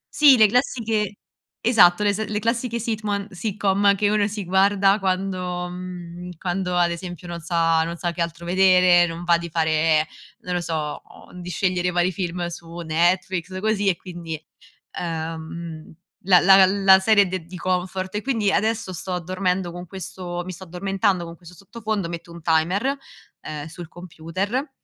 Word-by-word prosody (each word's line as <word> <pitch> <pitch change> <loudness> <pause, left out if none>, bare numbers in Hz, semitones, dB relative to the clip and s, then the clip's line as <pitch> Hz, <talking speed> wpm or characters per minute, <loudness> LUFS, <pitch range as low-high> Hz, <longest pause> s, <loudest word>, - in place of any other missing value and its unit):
Sì, 285 -4 +7
le 220 - +7
classiche 220 -3 0 0.4
esatto, 210 -4 +5
le 205 -1 +3
s 220 +2 -2
le 210 - -2
classiche 230 +2 -1
sitman 215 -3 -2
sitcom 200 0 +1
che 205 +1 +1
uno 210 -1 +2
si 205 -2 -5
guarda 195 +2 +3
quando 185 -2 -2
mhmm, 180 -1 -8
quando 180 0 -2
ad 175 -1 +3
esempio 175 0 -7
non 170 0 -5
sa 165 -1 +2
non 170 +1 -4
sa 175 0 -2
che 170 0 -5
altro 170 0 -4
vedere, 180 -1 +5
non 165 +1 -6
va 170 -1 +3
di 170 0 -6
fare, 155 -1 +2 0.4
non 180 - -4
lo 175 - 0
so, 155 -3 -3 0.4
di 175 - -7
scegliere 180 +1 0
vari 175 +1 +1
film 175 -1 -3
su 170 0 -9
Netflix 175 +3 0
così 210 -1 0
e 180 - +2
quindi 170 -3 -7 0.6
ehm, 160 -1 -6 0.3
la 180 -1 +6
la 195 +1 +7
la 190 -1 +7
la 195 -1 +6
serie 205 0 +4
de 185 -2 -4
di 180 +2 -10
comfort 185 +1 -2
e 210 - -2
quindi 225 -6 +1
adesso 220 -2 0
sto 180 +2 -3
dormendo 185 0 -1
con 175 +1 -8
questo 180 -1 -6
mi 185 - -5
sto 185 +2 -10
addormentando 190 +1 -1
con 165 - -10
questo 175 +1 -14
sottofondo, 210 -1 -4
metto 170 0 -7
un 170 - -10
timer, 180 - +1 0.5
ehm, 150 0 -6
sul 165 0 -9
computer, 185 - -4
180 Hz, 170 wpm, -23 LUFS, 170-200 Hz, 0.6 s, Sì